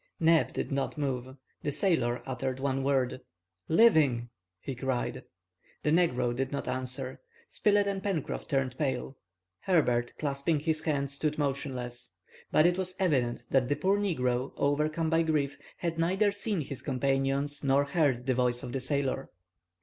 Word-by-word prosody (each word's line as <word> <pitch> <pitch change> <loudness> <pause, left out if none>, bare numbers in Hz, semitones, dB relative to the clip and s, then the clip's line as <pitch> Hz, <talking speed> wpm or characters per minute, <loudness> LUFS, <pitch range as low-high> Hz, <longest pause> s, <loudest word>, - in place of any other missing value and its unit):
Neb 165 -1 +4
did - - -3
not 135 +1 -1
move. 130 -2 -3 0.2
The 150 - -1
sailor 130 -9 +1
uttered 130 0 -3
one 135 0 0
word. 135 -2 0 0.5
"Living!" 150 - +4 0.3
he 135 - -5
cried. 130 -1 -2 0.6
The 150 - +2
negro 130 -8 +2
did 135 +1 -2
not 140 - -3
answer. 130 +1 -3 0.3
Spilett 205 -1 +2
and 200 -1 -2
Pencroff 190 -8 -3
turned 135 -2 -1
pale. 135 -2 -1 0.4
Herbert, 125 - +1
clasping 145 +1 0
his 155 0 0
hands, 140 -3 +1
stood 150 +1 -1
motionless. 130 -4 -2 0.4
But 155 - +5
it 175 +1 +3
was 185 -1 -2
evident 135 -10 +1
that 130 -2 +3
the 145 - +2
poor 190 +7 +2
negro, 130 -10 0
overcome 155 +3 +1
by 165 0 +4
grief, 150 -3 0 0.2
had 165 -2 -3
neither 190 +5 +2
seen 205 -2 -1
his 140 -2 -5
companions 135 +1 0
nor 140 +1 +4
heard 140 -5 +1
the 130 - +2
voice 125 0 +1
of 125 - -5
the 135 - -1
sailor. 135 0 -1
140 Hz, 155 wpm, -30 LUFS, 130-160 Hz, 0.6 s, But